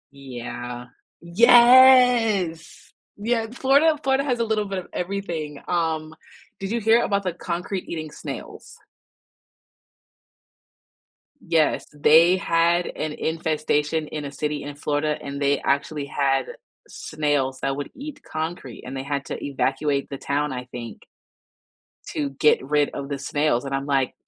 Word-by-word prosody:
Yeah. 120 -2 -7 0.4
Yes 235 -4 +5 0.3
Yeah, 225 +2 -1
Florida, 280 +5 +3
Florida 270 0 +2
has 250 -4 0
a - - +2
little 220 -2 0
bit 195 -1 -4
of 180 - -10
everything. 170 -6 -4
Um, 160 -2 -1 0.5
did 195 - -4
you 235 - 0
hear 225 +2 +4
about 200 -1 0
the 180 -2 -2
concrete 180 +2 -4
eating 155 -2 -5
snails? 140 -5 -9 2.7
Yes, 160 -2 +2
they 160 +5 +5
had 170 0 +2
an 155 - -4
infestation 155 -1 -1
in 150 -1 -5
a 140 - -6
city 150 0 -3
in 145 0 -7
Florida, 150 +1 -1
and 140 0 -6
they 140 0 +2
actually 140 +1 -1
had 135 -1 0 0.4
snails 145 -4 -2
that 135 0 -1
would 145 0 -5
eat 290 +1 -9
concrete 155 -6 -5
and 130 +2 -7
they 135 - -4
had 140 0 -3
to - - -6
evacuate 140 +1 -1
the 140 - -5
town, 145 +1 -2
I 125 0 -5
think. 120 -2 -9 1.1
To 145 -2 -3
get 150 +2 +3
rid 145 +1 +1
of 140 - -6
the 140 0 -3
snails, 145 -2 0
and 135 - -5
I'm 135 0 -2
like, 135 -3 0
155 Hz, 140 wpm, -23 LUFS, 140-195 Hz, 2.7 s, Yes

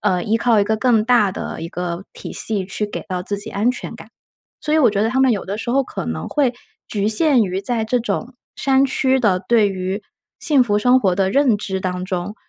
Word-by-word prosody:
呃， 185 -4 +1
依 220 +2 +1
靠 230 -2 +3
一 - - +2
个 220 +2 0
更 225 -2 +2
大 230 -6 +3
的 - - -6
一 165 - -5
个 180 +1 -5
体 - - -8
系 205 -4 0
去 210 +2 -2
给 - - -5
到 180 -1 -2
自 205 +2 -3
己 215 +2 -5
安 215 +4 0
全 250 - -7
感。 - - -13 0.5
所 300 - -2
以 - - +4
我 255 - +5
觉 200 0 0
得 225 - +2
他 260 - -1
们 260 -2 +4
有 205 - -3
的 200 +2 -3
时 235 - -3
候 270 +2 +3
可 - - -6
能 80 0 -4
会 275 -5 +1 0.4
局 205 0 0
限 255 +2 +4
于 190 -1 -2
在 225 0 0
这 245 +3 +1
种 240 +1 -3 0.2
山 270 0 +2
区 265 0 +1
的 195 -7 +2
对 225 -4 +4
于 190 +2 -4 0.4
幸 285 -5 +3
福 210 -3 +1
生 250 +4 +4
活 190 -6 +2
的 190 -1 +1
认 265 -3 +3
知 190 -2 -3
当 180 0 -3
中， 185 +2 -4
215 Hz, 260 characters per minute, -20 LUFS, 190-245 Hz, 0.5 s, 我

